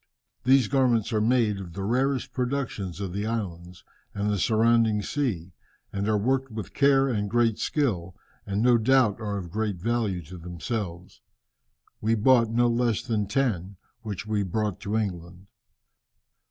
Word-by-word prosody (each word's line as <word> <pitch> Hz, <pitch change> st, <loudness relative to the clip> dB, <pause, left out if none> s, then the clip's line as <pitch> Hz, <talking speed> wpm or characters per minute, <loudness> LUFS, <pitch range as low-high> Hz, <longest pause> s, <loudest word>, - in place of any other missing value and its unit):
"These 130 Hz, -2 st, +5 dB
garments 120 Hz, -4 st, +2 dB
are 110 Hz, -, +2 dB
made 110 Hz, -3 st, +2 dB
of 90 Hz, -4 st, -8 dB
the 95 Hz, +2 st, -5 dB
rarest 130 Hz, +5 st, 0 dB
productions 125 Hz, -8 st, -3 dB
of 95 Hz, -3 st, -4 dB
the 100 Hz, +2 st, -2 dB
islands 90 Hz, -6 st, -5 dB, 0.3 s
and 105 Hz, 0 st, 0 dB
the 100 Hz, -, 0 dB
surrounding 110 Hz, 0 st, +3 dB
sea, 95 Hz, -, -2 dB, 0.4 s
and 100 Hz, +1 st, -2 dB
are 110 Hz, -, +3 dB
worked 130 Hz, +5 st, 0 dB
with 110 Hz, -2 st, -7 dB
care 140 Hz, -1 st, +4 dB
and 105 Hz, -5 st, -1 dB
great 115 Hz, -1 st, +2 dB
skill, 95 Hz, -, -1 dB, 0.3 s
and 100 Hz, +2 st, -1 dB
no 120 Hz, -1 st, +5 dB
doubt 120 Hz, -2 st, +3 dB
are 105 Hz, -2 st, -2 dB
of 90 Hz, -4 st, -6 dB
great 110 Hz, 0 st, -1 dB
value 105 Hz, -2 st, -1 dB
to 90 Hz, +4 st, -10 dB
themselves. 90 Hz, +1 st, -5 dB, 0.8 s
We 110 Hz, +2 st, +2 dB
bought 115 Hz, +1 st, +4 dB
no 120 Hz, +2 st, +3 dB
less 120 Hz, -1 st, +1 dB
than 110 Hz, -5 st, -1 dB
ten, 100 Hz, -6 st, -1 dB, 0.2 s
which 105 Hz, -3 st, -5 dB
we 110 Hz, -1 st, 0 dB
brought 105 Hz, +1 st, -2 dB
to 105 Hz, +2 st, -2 dB
England." 90 Hz, -3 st, -4 dB
110 Hz, 155 wpm, -26 LUFS, 95-120 Hz, 0.8 s, These